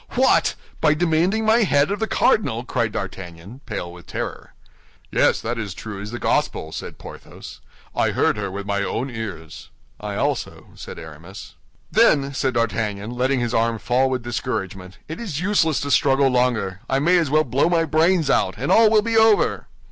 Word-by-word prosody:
"What! 260 +1 +3 0.2
by 155 -1 +3
demanding 175 +6 +1
my 220 +2 +4
head 150 -8 +2
of 205 - -2
the 220 - -1
cardinal?" 120 - +1
cried 115 -3 -1
D'Artagnan, 95 +4 -7
pale 90 -6 -5
with 90 -2 -14
terror. - - -6 0.6
"Yes, - - +3
that 115 +1 -3
is 100 -6 -5
true 105 -3 -7
as 105 - -6
the 120 - -5
Gospel," 80 -8 -1
said - - -7
Porthos; - - -11 0.3
"I - - +2
heard - - +1
her 105 -2 -3
with 100 +1 -6
my 100 0 -1
own 125 +6 -3
ears." 100 -9 -7 0.3
"I - - -5
also," - - -3
said - - -10
Aramis. 80 +5 -11 0.4
"Then," 140 -1 +3
said 130 -1 -1
D'Artagnan, 110 -2 -1
letting 130 +1 0
his 120 0 -2
arm 115 0 +1
fall 125 +4 +1
with 130 -2 -2
discouragement, 95 -6 -4
"it 160 - -7
is 190 -11 -4
useless 175 -5 +1
to 145 - -3
struggle 135 -1 +3
longer. 120 -7 0
I 135 - +2
may 175 +6 +3
as 160 -5 0
well 155 +2 +3
blow 135 +4 +1
my 165 -2 +2
brains 160 +1 +2
out, 95 -8 +1
and 135 +5 -2
all 225 -1 +6
will 215 -1 +4
be 230 0 -1
over." 220 -2 +3
125 Hz, 185 wpm, -22 LUFS, 105-160 Hz, 0.6 s, all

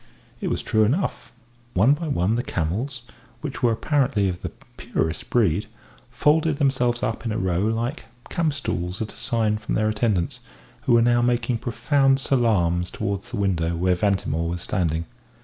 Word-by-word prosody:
It - - -3
was - - -2
true 110 0 +3
enough. 125 - -1 0.4
One 110 +10 +5
by 160 +2 -3
one 105 - +1
the 120 - +1
camels, 115 - -3 0.4
which 145 -3 -5
were 120 -2 +4
apparently 125 -4 +1
of 90 -1 -5
the - - -3 0.3
purest 80 0 -2
breed, 105 -3 +2 0.4
folded 150 +4 +2
themselves 125 -4 +1
up 110 - -2
in 115 - -2
a 105 - -1
row 90 -3 0
like 115 - -1 0.2
campstools 140 - -2
at 110 - -7
a - - -17
sign 110 -2 0
from 105 - -3
their 110 0 +2
attendants, 105 -5 0 0.5
who - - +3
were 115 0 +6
now 120 0 +4
making 120 -1 +1
profound 135 +4 +2
salaams 95 -10 +2
towards 100 -1 -3
the 120 - -4
window 85 -4 0
where 90 +2 +2
Ventimore 90 -4 0
was 85 +1 -4
standing. 80 -2 -1
110 Hz, 165 wpm, -24 LUFS, 95-125 Hz, 0.5 s, were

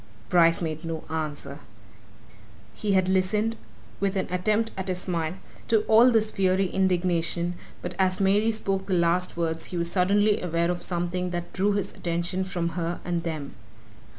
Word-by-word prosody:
Bryce 170 -1 +4
made 155 0 -3
no 165 -1 -4
answer. 150 -2 -4 1.1
He 205 -2 -1
had 185 -1 +3
listened, 200 +4 +1 0.4
with 195 0 0
an 190 - 0
attempt 215 +5 +1
at 190 0 -4
a 185 - 0
smile, 170 -2 -2 0.3
to 220 -2 +3
all 225 +3 +6
this 220 -2 +2
fiery 190 -1 +1
indignation, 175 -2 +1 0.3
but 180 - -4
as 185 -1 +2
Mary 200 +3 +3
spoke 195 -3 -2
the 190 - +1
last 175 +1 +1
words 165 -1 -1
he 180 - -5
was 170 0 -2
suddenly 205 +3 +3
aware 170 0 0
of 175 - -4
something 180 +1 -2
that 175 -1 -5
drew 200 +2 +1
his 200 -2 -2
attention 175 +2 -2
from 175 -3 -2
her 170 +1 -3
and 175 -1 -1
them. 155 -4 -5
180 Hz, 165 wpm, -26 LUFS, 170-195 Hz, 1.1 s, all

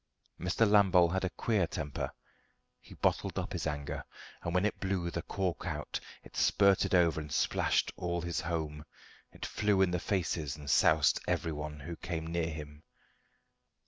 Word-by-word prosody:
Mr. 90 +5 +2
Lambole 95 -4 +5
had 95 - 0
a 95 - +1
queer 105 -3 0
temper. 75 -4 -4 0.7
He - - -14
bottled - - 0
up - - -3
his - - -2
anger, 75 -2 -3 0.4
but 85 - -2
when 90 +3 +2
it 105 - -1
blew 95 -3 -1
the 85 - -2
cork 95 -2 -2
out - - -3 0.2
it - - -15
spurted 100 -2 +4
over 85 -3 +3
and 75 -1 -9
splashed - - +1
all 85 -1 -2
his 85 0 -2
home; 80 -3 -3 0.5
it - - -7
flew 105 -2 +1
in 90 - +1
the 90 - 0
faces 85 -7 -1
and 75 -1 -10
soused 75 -2 +4
everyone 75 -2 -2
who 85 +4 -6
came 85 -3 -4
near 85 0 -1
him. 75 -1 -8
85 Hz, 165 wpm, -32 LUFS, 75-95 Hz, 0.7 s, Lambole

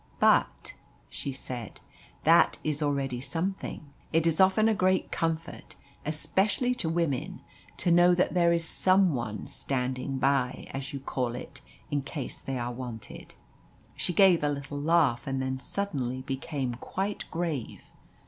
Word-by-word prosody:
"But," - - +3 0.4
she 140 - -4
said, 125 -4 -7 0.4
"that 165 +2 +5
is 155 0 -1
already 135 -4 -1
something. 165 -2 -4 0.2
It 165 0 +2
is 165 +1 +3
often 190 +4 +5
a 225 - +4
great 185 -2 +1
comfort, 165 0 -3 0.3
especially 195 +10 +1
to 175 -10 -2
women, 165 -6 -1 0.4
to 175 - +1
know 175 +1 +6
that 180 - +1
there 170 -2 +4
is 170 -1 +1
some 185 -1 +3
one 110 -5 -3
'standing 130 0 -2
by,' 130 -1 +1
as 135 0 -5
you 140 - -4
call 125 -3 -2
it, - - -9 0.3
in 145 -1 +1
case 140 -1 -6
they 135 -1 -3
are 120 0 -2
wanted." 120 -3 -8 0.6
She - - -1
gave 180 -3 +5
a 145 - +3
little 145 0 -4
laugh, 150 -6 +3
and 135 -1 -1
then 130 0 -2
suddenly 130 -6 -2
became 135 -1 -3
quite 195 - -3
grave. 160 -8 -4
145 Hz, 150 wpm, -28 LUFS, 130-170 Hz, 0.6 s, know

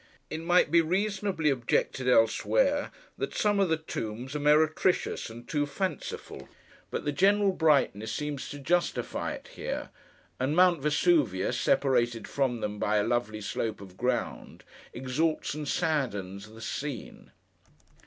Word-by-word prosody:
It - - -3
might 170 -2 +3
be 170 0 +6
reasonably 190 -2 0
objected 125 0 0
elsewhere, 265 - +3 0.3
that - - -3
some 205 -1 +2
of 195 -3 +3
the 160 - +2
tombs 125 -3 -5
are - - -1
meretricious 155 +3 +2
and 120 +1 -11
too 145 -2 0
fanciful; 145 - -5 0.4
but - - -4
the 145 - +1
general 200 +5 +3
brightness 140 - +2
seems 145 +3 -4
to 145 - -6
justify 170 +5 -1
it - - -10
here; - - -5 0.5
and 135 +4 0
Mount 180 -3 +5
Vesuvius, 145 - +2
separated 120 -4 +1
from 130 -4 -1
them 105 0 -3
by 105 +1 +1
a 105 - +3
lovely 110 -3 -1
slope 110 +1 -3
of 95 -2 -12
ground, 125 +3 -3 0.3
exalts 140 +7 -1
and 150 0 -5
saddens 105 - -1
the 110 +1 -13
scene. 140 0 -5
145 Hz, 140 wpm, -29 LUFS, 115-165 Hz, 0.5 s, be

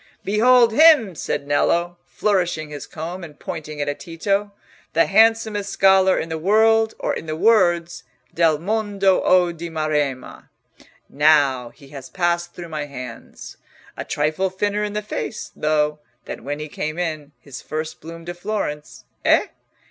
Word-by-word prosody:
"Behold 235 +3 +4
him!" 295 - +6
said 145 -2 -4
Nello, 170 +4 +1
flourishing 175 -7 -1
his 145 -3 -7
comb 170 +3 -7
and 150 -3 -11
pointing 155 -1 -7
it 145 0 -2
at 145 - -3
Tito, 195 +4 -2 0.4
"the 165 - +4
handsomest 220 -1 +2
scholar 190 -1 +4
in - - -2
the 160 -1 -4
world 220 +4 +3
or - - -2
in 160 - -6
the 155 - -3
wolds, 175 -3 +2 0.3
('Del 165 -2 +3
mondo 200 +1 +1
o 180 -1 +3
di 170 0 -7
maremma') 150 -5 -3 0.6
now 140 -4 +3
he 140 +1 -18
has 135 -2 -10
passed 175 -1 -1
through 175 -1 -8
my 155 -2 -4
hands! 125 -4 -10 0.4
A - - -5
trifle 155 +6 -1
thinner 205 +2 -1
in 210 -1 -3
the 210 0 -3
face, 215 +1 -5
though, 150 0 0 0.3
than - - -8
when 145 +2 -4
he 150 0 -6
came 155 +1 -5
in 155 -4 -4
his 135 -3 -10
first 155 +1 -5
bloom 165 +1 -10
to 175 - -5
Florence—eh? 175 -6 -2
170 Hz, 155 wpm, -21 LUFS, 150-200 Hz, 0.6 s, him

